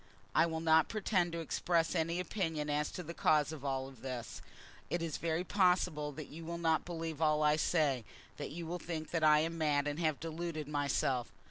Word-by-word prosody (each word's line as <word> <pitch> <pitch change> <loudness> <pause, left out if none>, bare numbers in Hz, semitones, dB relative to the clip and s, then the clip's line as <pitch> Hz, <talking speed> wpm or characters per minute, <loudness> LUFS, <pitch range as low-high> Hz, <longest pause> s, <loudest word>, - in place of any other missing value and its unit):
I 170 - +5
will 160 -1 -3
not 160 -1 +4
pretend 190 -5 +1
to 170 - -2
express 165 +1 +1
any 165 0 0
opinion 160 -5 -2
as 150 0 0
to 180 - -5
the 170 +1 -6
cause 155 -2 +3
of 155 -4 -8
all 135 -1 -2
this. 125 -2 -6 0.5
It 175 - 0
is 165 -3 -3
very 165 +1 -1
possible 180 -6 +2
that 155 +1 -6
you 165 +2 -9
will 170 +1 -4
not 160 -2 +1
believe 165 -3 -4
all 155 -1 +3
I 150 0 +5
say, 150 -6 +2 0.3
that - - -4
you 165 +4 -6
will 175 +2 -4
think 160 -2 -5
that 165 -2 0
I 150 -1 +6
am 165 +1 -2
mad 145 -2 +2
and 145 +2 -2
have 155 -4 +1
deluded 165 -1 -4
myself. 140 -4 0
160 Hz, 205 wpm, -34 LUFS, 150-170 Hz, 0.5 s, I